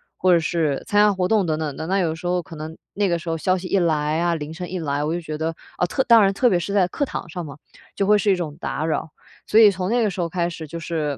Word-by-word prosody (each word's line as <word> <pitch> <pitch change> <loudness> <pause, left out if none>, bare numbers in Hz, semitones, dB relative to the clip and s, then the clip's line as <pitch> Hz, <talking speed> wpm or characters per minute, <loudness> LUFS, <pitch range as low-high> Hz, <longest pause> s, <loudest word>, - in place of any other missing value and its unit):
或 185 0 +2
者 170 - +6
是 160 -4 -1
参 205 - +1
加 210 0 +5
活 185 -2 0
动 210 -4 +2
等 155 -1 0
等 150 -3 -3
的。 160 - -5
那 190 +2 +1
有 165 -3 0
时 165 +2 -6
候 180 0 0
可 165 - -11
能 155 +1 -7 0.2
那 200 0 +1
个 170 - +1
时 170 - -11
候 165 - 0
消 185 +2 +1
息 185 0 -6
一 195 - +2
来 155 -2 +1
啊， 170 0 +1
铃 155 0 -6
声 180 +1 -6
一 185 - -4
来， 145 -3 -2
我 155 - -1
就 - - -2
觉 155 -2 -6
得， 160 +1 -2 0.2
啊， 180 - +1
特 265 +9 0
当 230 -2 +6
然 195 -1 +4
特 245 +6 +2
别 175 - +3
是 200 - -4
在 195 -3 +3
课 285 - -2
堂 225 - -4
上 175 +2 -5
嘛， 140 0 -10 0.4
就 200 - 0
会 210 +2 +5
是 205 0 +2
一 - - +4
种 160 -5 -4
打 150 +3 -3
扰， 160 0 -2 0.4
所 220 - +5
以 215 -2 +8
从 185 0 -3
那 235 0 +2
个 210 - +1
时 180 - -4
候 170 - -1
开 170 0 -1
始， 160 -2 -8
就 170 +3 -6
是 155 -4 -2
175 Hz, 340 characters per minute, -22 LUFS, 160-190 Hz, 0.4 s, 以